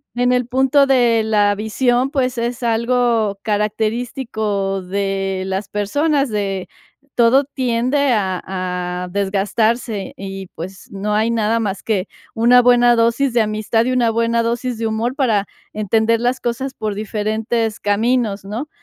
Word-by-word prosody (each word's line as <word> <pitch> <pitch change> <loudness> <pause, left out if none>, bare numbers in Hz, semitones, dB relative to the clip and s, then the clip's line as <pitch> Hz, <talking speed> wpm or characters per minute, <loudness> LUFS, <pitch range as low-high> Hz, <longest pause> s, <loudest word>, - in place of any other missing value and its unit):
en 245 +1 +2
el 250 -1 +1
punto 265 +2 +3
de 240 -4 +3
la 205 -2 +2
visión, 245 +5 0
pues, 255 -3 -1
es 240 +1 -3
algo 230 -3 +1
característico 215 -2 -1
de 195 0 -2
las 190 +1 -3
personas, 280 +7 0
de 195 -3 -2 0.5
todo 245 +4 +4
tiende 260 +1 0
a 190 -5 -1 0.6
a - - -5
desgastarse 200 +3 -1
y, 195 -1 -7
pues, 185 +3 -9
no 200 +2 -3
hay 220 +2 +2
nada 225 0 +1
más 200 -3 -3
que 200 -3 -1 0.3
una 245 +2 +5
buena 245 0 +5
dosis 235 +3 +2
de 235 - +3
amistad 215 +2 0
y 255 - 0
una 245 -2 +2
buena 230 +1 +1
dosis 240 +1 -2
de 225 0 -1
humor 225 +3 -2
para 225 -8 +1 0.3
entender 220 +2 +1
las 245 +2 0
cosas 255 +3 -3
por 215 -4 -4
diferentes 215 +1 -2
caminos, 210 0 0
¿no? 230 +9 -5
225 Hz, 145 wpm, -19 LUFS, 205-245 Hz, 0.6 s, una